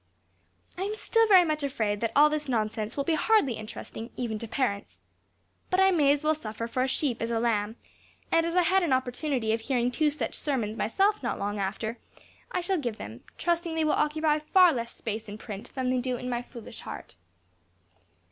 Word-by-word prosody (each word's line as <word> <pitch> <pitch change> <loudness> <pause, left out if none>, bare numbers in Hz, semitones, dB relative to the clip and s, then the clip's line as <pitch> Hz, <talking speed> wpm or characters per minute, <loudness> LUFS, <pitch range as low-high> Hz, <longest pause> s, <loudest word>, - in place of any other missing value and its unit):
I - - -3
am 410 +2 -2
still 455 +1 +2
very 375 -4 +7
much 305 -1 -1
afraid 220 -7 -1
that 230 -1 0
all 295 +1 +8
this 300 -2 -2
nonsense 215 -1 -1
will 280 - 0
hardly 420 - +3
be - - -7
interesting, 220 +1 -7
even 225 -4 -2
to 230 - -6
parents. 210 -4 -2 0.7
But 370 - +2
I 385 0 +6
may 295 -6 +4
as 290 +1 +1
well 310 +1 +3
suffer 230 -6 -5
for 245 +2 -2
a 260 - +2
sheep 260 -2 0
as 230 - -1
a 230 -1 0
lamb; 220 -2 0 0.6
and, 330 - +4
as 335 +1 -2
I 360 - +5
had 380 +3 +3
an 330 -7 +1
opportunity 255 -2 0
of 225 - -1
hearing 245 0 0
two 300 +4 +2
such 295 - -3
sermons 235 -7 -2
myself 390 - +1
not 240 - -2
long 205 +1 -2
after, 220 +4 -3 0.5
I 360 - -1
shall 370 0 0
give 240 -6 -3
them, 110 +3 -8 0.2
trusting 340 -1 0
they 320 - +1
will 305 - +3
occupy 305 0 +2
far 355 +3 +5
less 235 -2 -3
space 220 -1 -5
in 205 - -7
print 210 -2 -8
than 255 -1 0
they 255 - +1
do 250 0 -2
in 250 +1 -4
my 240 0 -1
foolish 240 -2 -10
heart. - - -8
255 Hz, 210 wpm, -28 LUFS, 225-310 Hz, 0.7 s, all